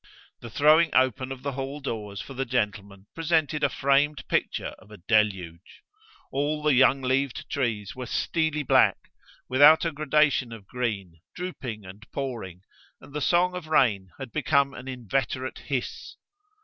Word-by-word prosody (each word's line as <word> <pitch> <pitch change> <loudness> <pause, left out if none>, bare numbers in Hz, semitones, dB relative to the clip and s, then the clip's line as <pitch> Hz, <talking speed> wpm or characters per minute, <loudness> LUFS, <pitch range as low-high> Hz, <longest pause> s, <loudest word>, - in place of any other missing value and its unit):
The 120 - -9
throwing 155 +6 +5
open 130 0 +2
of 130 -1 -7
the 140 - -2
hall 135 +2 -5
doors 105 -7 -5
for 135 - -9
the 135 +1 -2
gentlemen 100 -4 -3
presented 160 -2 0
a 145 - +4
framed 140 +2 +1
picture - - -1
of - - -19
a 105 - -12
deluge. 95 -4 -1 0.5
All 150 +2 -1
the 150 -1 +4
young 130 +1 +4
leaved 130 0 -1
trees 110 -7 -2
were 125 -1 -6
steely 155 +3 -1
black, - - +4 0.5
without 145 +6 +6
a 165 - 0
gradation 150 -4 +2
of 110 -4 -10
green, 100 -8 -4 0.2
drooping 130 - -6
and 95 +4 -11
pouring, 115 -10 -5 0.4
and 140 - -15
the 150 - -3
song 180 +5 +3
of 180 -3 -6
rain 110 -11 +2
had 135 -4 -8
become 140 -2 +1
an 130 - -10
inveterate 130 +1 -3
hiss. 135 -4 -4
130 Hz, 155 wpm, -26 LUFS, 110-145 Hz, 0.5 s, without